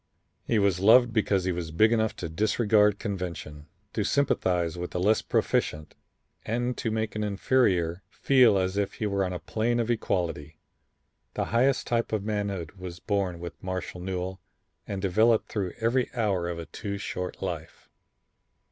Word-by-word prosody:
He 115 Hz, -, +2 dB
was 100 Hz, -3 st, +2 dB
loved 115 Hz, +4 st, +6 dB
because 105 Hz, -4 st, +2 dB
he 95 Hz, -, 0 dB
was 85 Hz, -2 st, -4 dB
big 110 Hz, +8 st, +4 dB
enough 110 Hz, -1 st, +1 dB
to -, -, -5 dB
disregard 105 Hz, +3 st, +3 dB
convention, 85 Hz, -7 st, -5 dB, 0.3 s
to 105 Hz, -, 0 dB
sympathize 90 Hz, -, +1 dB
with 90 Hz, 0 st, -4 dB
the 90 Hz, -, -3 dB
less 105 Hz, +5 st, +3 dB
proficient 75 Hz, -1 st, -1 dB, 0.5 s
and 120 Hz, +2 st, -1 dB
to 115 Hz, -, -1 dB
make 110 Hz, -1 st, -2 dB
an 105 Hz, -, -1 dB
inferior 95 Hz, -5 st, +1 dB
feel 125 Hz, -7 st, +4 dB
as 95 Hz, +1 st, 0 dB
if 100 Hz, -1 st, -1 dB
he 110 Hz, -, -3 dB
were 100 Hz, -1 st, 0 dB
on 90 Hz, -, -2 dB
a 90 Hz, -, -3 dB
plane 115 Hz, +7 st, -1 dB
of 120 Hz, 0 st, 0 dB
equality. 85 Hz, -9 st, -2 dB, 0.8 s
The -, -, 0 dB
highest 130 Hz, +3 st, +3 dB
type 115 Hz, -1 st, 0 dB
of 110 Hz, -3 st, -1 dB
manhood 100 Hz, -6 st, -2 dB
was 90 Hz, -2 st, -7 dB
born 100 Hz, -5 st, -1 dB
with 85 Hz, -3 st, -8 dB
Marshall 95 Hz, -1 st, -5 dB
Newell 95 Hz, 0 st, -4 dB, 0.5 s
and 100 Hz, -1 st, -4 dB
developed 110 Hz, +4 st, +3 dB
through 95 Hz, -5 st, -2 dB
every 120 Hz, +3 st, +1 dB
hour 100 Hz, -7 st, 0 dB
of 85 Hz, -, -4 dB
a 85 Hz, -, -6 dB
too 100 Hz, +6 st, -5 dB
short 90 Hz, -2 st, -5 dB
life. 85 Hz, -4 st, -6 dB
100 Hz, 165 wpm, -27 LUFS, 90-110 Hz, 0.8 s, loved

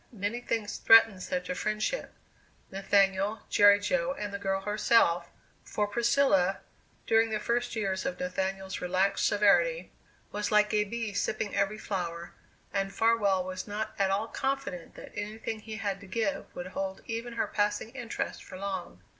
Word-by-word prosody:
Many 220 Hz, +2 st, -3 dB
things 220 Hz, -4 st, -2 dB
threatened 225 Hz, -4 st, +6 dB
such 180 Hz, 0 st, -3 dB
a -, -, -1 dB
friendship 215 Hz, -, -2 dB, 0.6 s
Nathaniel, 195 Hz, +1 st, +2 dB
Jerry 205 Hz, 0 st, +7 dB
Jo, 255 Hz, +5 st, 0 dB
and 210 Hz, -7 st, -5 dB
the 200 Hz, -, -3 dB
girl 195 Hz, -1 st, -1 dB
herself 200 Hz, -4 st, +3 dB, 0.3 s
for 210 Hz, -, -1 dB
Priscilla, 205 Hz, -3 st, +2 dB, 0.4 s
during 225 Hz, 0 st, +3 dB
the 215 Hz, -1 st, -1 dB
first 240 Hz, +2 st, -1 dB
years 195 Hz, -3 st, -1 dB
of 180 Hz, -, -3 dB
Nathaniel's 190 Hz, +1 st, -3 dB
relaxed 190 Hz, +2 st, +1 dB
severity, 180 Hz, -5 st, +3 dB, 0.4 s
was 210 Hz, 0 st, -2 dB
like 210 Hz, 0 st, +4 dB
a 210 Hz, 0 st, +3 dB
bee 225 Hz, 0 st, -4 dB
sipping 210 Hz, +1 st, -2 dB
every 200 Hz, +2 st, +1 dB
flower, 175 Hz, -5 st, -4 dB, 0.4 s
and 195 Hz, -1 st, 0 dB
Farwell 205 Hz, -4 st, +2 dB
was 185 Hz, +2 st, -6 dB
not 210 Hz, +1 st, -3 dB
at 195 Hz, -1 st, +3 dB
all 200 Hz, +3 st, 0 dB
confident 270 Hz, -10 st, -3 dB
that -, -, -11 dB
anything 215 Hz, +1 st, -5 dB
he 220 Hz, 0 st, -8 dB
had 200 Hz, -2 st, -2 dB
to 200 Hz, -, -13 dB
give 200 Hz, +1 st, -1 dB
would 175 Hz, -, -5 dB
hold 190 Hz, 0 st, -4 dB
even 230 Hz, +1 st, -4 dB
her 230 Hz, -, 0 dB
passing 210 Hz, +2 st, -1 dB
interest 240 Hz, -4 st, -4 dB
for 185 Hz, -, -10 dB
long. 190 Hz, -2 st, -5 dB
205 Hz, 160 wpm, -29 LUFS, 190-225 Hz, 0.6 s, Jerry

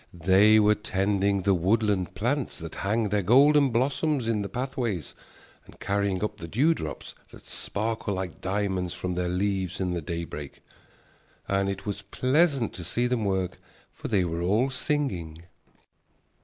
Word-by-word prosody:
They 95 Hz, +5 st, +5 dB
were 105 Hz, 0 st, +5 dB
tending 100 Hz, -2 st, 0 dB
the 100 Hz, -, +3 dB
woodland 95 Hz, 0 st, +1 dB
plants 125 Hz, +7 st, -1 dB
that 80 Hz, -1 st, -7 dB
hang 105 Hz, +2 st, 0 dB
their 105 Hz, 0 st, +1 dB
golden 140 Hz, +7 st, +5 dB
blossoms 130 Hz, +2 st, 0 dB
in 110 Hz, -2 st, +1 dB
the 100 Hz, -, -4 dB
pathways 120 Hz, -, -3 dB, 0.5 s
and -, -, -16 dB
carrying 100 Hz, -1 st, -1 dB
up 105 Hz, 0 st, -2 dB
the 85 Hz, -, -7 dB
dewdrops 125 Hz, -, 0 dB, 0.2 s
that -, -, -15 dB
sparkle 110 Hz, -1 st, -3 dB
like 95 Hz, -3 st, -5 dB
diamonds 95 Hz, -2 st, -1 dB
from 90 Hz, 0 st, -3 dB
their 90 Hz, 0 st, -1 dB
leaves 95 Hz, 0 st, -1 dB
in 90 Hz, -2 st, -1 dB
the 85 Hz, -1 st, -2 dB
daybreak. 80 Hz, -3 st, -6 dB, 0.9 s
And 100 Hz, 0 st, +1 dB
it 100 Hz, 0 st, -5 dB
was 105 Hz, -1 st, -3 dB
pleasant 130 Hz, -, +1 dB
to 90 Hz, -, -7 dB
see 120 Hz, +8 st, 0 dB
them 125 Hz, -3 st, 0 dB
work, 95 Hz, -2 st, -1 dB, 0.3 s
for -, -, -7 dB
they 95 Hz, -4 st, +2 dB
were 85 Hz, 0 st, -3 dB
all 110 Hz, +9 st, +2 dB
singing. 105 Hz, -, -2 dB
100 Hz, 155 wpm, -27 LUFS, 90-115 Hz, 0.9 s, They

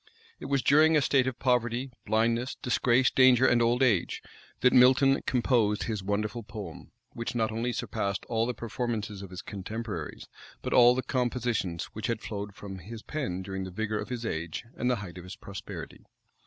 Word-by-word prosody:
It -, -, -8 dB
was 140 Hz, -2 st, 0 dB
during 155 Hz, +2 st, +5 dB
a -, -, +3 dB
state 130 Hz, -2 st, +3 dB
of 130 Hz, -1 st, -2 dB
poverty, 125 Hz, 0 st, 0 dB, 0.2 s
blindness, 115 Hz, +4 st, +1 dB
disgrace, 125 Hz, 0 st, +2 dB
danger, 130 Hz, -1 st, +6 dB
and 120 Hz, -2 st, +4 dB
old 120 Hz, +2 st, +3 dB
age, 110 Hz, -9 st, +1 dB, 0.4 s
that 125 Hz, -, +5 dB
Milton 135 Hz, +2 st, +6 dB
composed 120 Hz, -5 st, +2 dB
his 110 Hz, -3 st, -3 dB
wonderful 105 Hz, +4 st, -2 dB
poem, 105 Hz, -6 st, -9 dB, 0.2 s
which 115 Hz, +1 st, -4 dB
not 110 Hz, -2 st, +1 dB
only 115 Hz, +3 st, -1 dB
surpassed 100 Hz, -4 st, -3 dB
all 115 Hz, 0 st, 0 dB
the 125 Hz, -, -2 dB
performances 110 Hz, -4 st, -3 dB
of 100 Hz, -, -8 dB
his 90 Hz, 0 st, -8 dB
contemporaries, 100 Hz, -4 st, -6 dB, 0.4 s
but -, -, -2 dB
all 120 Hz, 0 st, +7 dB
the 130 Hz, -, -1 dB
compositions 120 Hz, -9 st, -1 dB
which 110 Hz, -, -4 dB
had 115 Hz, -2 st, -1 dB
flowed 100 Hz, -2 st, -5 dB
from 95 Hz, -2 st, -8 dB
his 110 Hz, +5 st, -9 dB
pen 110 Hz, -12 st, -3 dB
during 95 Hz, 0 st, -4 dB
the 95 Hz, -, -5 dB
vigor 105 Hz, +3 st, -2 dB
of -, -, -5 dB
his 120 Hz, -2 st, -4 dB
age 85 Hz, +1 st, -4 dB
and 125 Hz, -, 0 dB
the 125 Hz, -, +3 dB
height 90 Hz, 0 st, -9 dB
of -, -, -10 dB
his 90 Hz, +2 st, -8 dB
prosperity. 100 Hz, -1 st, -8 dB
115 Hz, 185 wpm, -29 LUFS, 100-125 Hz, 0.4 s, all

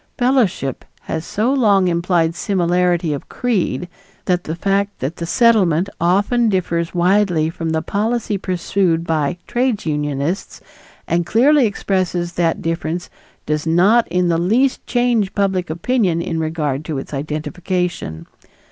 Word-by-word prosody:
Fellowship 245 Hz, -, +1 dB, 0.2 s
has 160 Hz, 0 st, -4 dB
so 230 Hz, +6 st, 0 dB
long 205 Hz, -8 st, +3 dB
implied 170 Hz, -1 st, +1 dB
similarity 175 Hz, -3 st, +1 dB
of 140 Hz, -, -7 dB
creed 205 Hz, -7 st, -1 dB, 0.4 s
that 180 Hz, -2 st, 0 dB
the 160 Hz, -, -3 dB
fact 200 Hz, +3 st, 0 dB
that 145 Hz, +6 st, -3 dB
the 170 Hz, -, -4 dB
Settlement 195 Hz, -6 st, +3 dB
often 205 Hz, +7 st, +2 dB
differs 170 Hz, -3 st, -1 dB
widely 175 Hz, -3 st, +2 dB
from 165 Hz, -1 st, -4 dB
the 160 Hz, 0 st, -1 dB
policy 220 Hz, +3 st, -1 dB
pursued 180 Hz, -2 st, 0 dB
by 160 Hz, 0 st, 0 dB
trades 245 Hz, -3 st, -1 dB
unionists 150 Hz, +3 st, -2 dB, 0.5 s
and 170 Hz, +1 st, +1 dB
clearly 260 Hz, +5 st, +4 dB
expresses 185 Hz, -4 st, -1 dB
that 170 Hz, -2 st, 0 dB
difference 165 Hz, +1 st, -3 dB, 0.3 s
does 150 Hz, +1 st, -2 dB
not 195 Hz, +8 st, +4 dB
in 180 Hz, 0 st, +1 dB
the 165 Hz, -1 st, +1 dB
least 235 Hz, +10 st, +1 dB
change 240 Hz, -5 st, +1 dB
public 190 Hz, -3 st, 0 dB
opinion 175 Hz, +1 st, 0 dB
in 170 Hz, -1 st, -2 dB
regard 155 Hz, -3 st, -2 dB
to 155 Hz, -3 st, -3 dB
its 135 Hz, -, -7 dB
identification. 155 Hz, -, -3 dB
180 Hz, 135 wpm, -19 LUFS, 165-205 Hz, 0.5 s, clearly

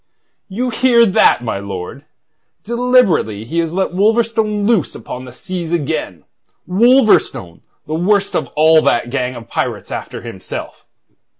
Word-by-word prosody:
"You 245 Hz, +6 st, -2 dB
hear 235 Hz, 0 st, +4 dB
that, 190 Hz, -, +3 dB
my 110 Hz, -4 st, -3 dB
lord? 100 Hz, +7 st, -7 dB, 0.6 s
Deliberately 230 Hz, -, +1 dB
he 165 Hz, +8 st, -2 dB
has 165 Hz, -1 st, -1 dB
let 190 Hz, +2 st, -1 dB
Wolverstone 215 Hz, +1 st, +1 dB
loose 215 Hz, -, +1 dB
upon 125 Hz, +1 st, -8 dB
the 125 Hz, -, -10 dB
seas 170 Hz, +5 st, -6 dB
again 150 Hz, -, -3 dB, 0.4 s
Wolverstone, 215 Hz, -, +2 dB, 0.2 s
the 155 Hz, -, -5 dB
worst 195 Hz, +5 st, +1 dB
of -, -, -1 dB
all 160 Hz, +1 st, +5 dB
that 120 Hz, -3 st, 0 dB
gang 125 Hz, -1 st, -2 dB
of 115 Hz, -2 st, -10 dB
pirates -, -, -4 dB
after -, -, -6 dB
himself. -, -, -8 dB
175 Hz, 135 wpm, -16 LUFS, -, 0.6 s, all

